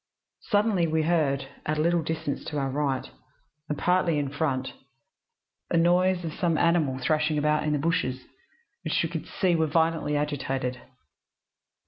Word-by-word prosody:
Suddenly, 205 -5 +2
we 160 0 +1
heard, 150 -5 +1 0.2
at 155 0 -1
a - - +1
little 170 +1 +2
distance 160 -3 -3
to 150 - -4
our 135 -1 -1
right, 140 -2 -1 0.6
and 150 - -2
partly 180 -3 +2
in 145 -2 -1
front, 135 -4 -1 1.0
a 170 - +1
noise 180 +1 +3
as 160 - -4
of - - -12
some 170 -3 +1
animal 160 -6 +2
thrashing 150 +3 +1
about 150 +1 +1
in 150 - +1
the - - +2
bushes, 145 -5 -1 0.6
which - - 0
we - - -1
could - - -5
see 180 -3 +1
were 160 -1 +2
violently 160 -1 +1
agitated. 135 -3 -2
155 Hz, 160 wpm, -27 LUFS, 145-170 Hz, 1.0 s, noise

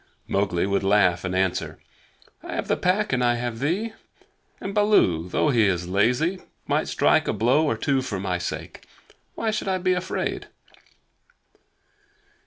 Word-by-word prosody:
Mowgli 95 -3 0
would 100 0 0
laugh 95 -3 +3
and 90 0 -3
answer: 95 -1 -1 0.6
"I - - -6
have - - -3
the - - +2
Pack 190 -1 0
and 125 -1 +1
I 120 0 +3
have 120 -1 -4
thee; 190 - -1 0.7
and 195 - -5
Baloo, 145 - +3
though 150 - +1
he 115 -5 +4
is 90 -2 0
so 90 - -9
lazy, 125 - +1 0.2
might - - 0
strike - - +2
a - - +1
blow 125 +9 +2
or 115 - 0
two 135 +3 +1
for 105 -7 -4
my 90 -2 -2
sake. 90 - -6 0.5
Why 225 -1 -1
should 215 -2 -3
I 190 -1 +1
be 185 0 +1
afraid?" 180 +1 -3
120 Hz, 165 wpm, -24 LUFS, -, 0.7 s, he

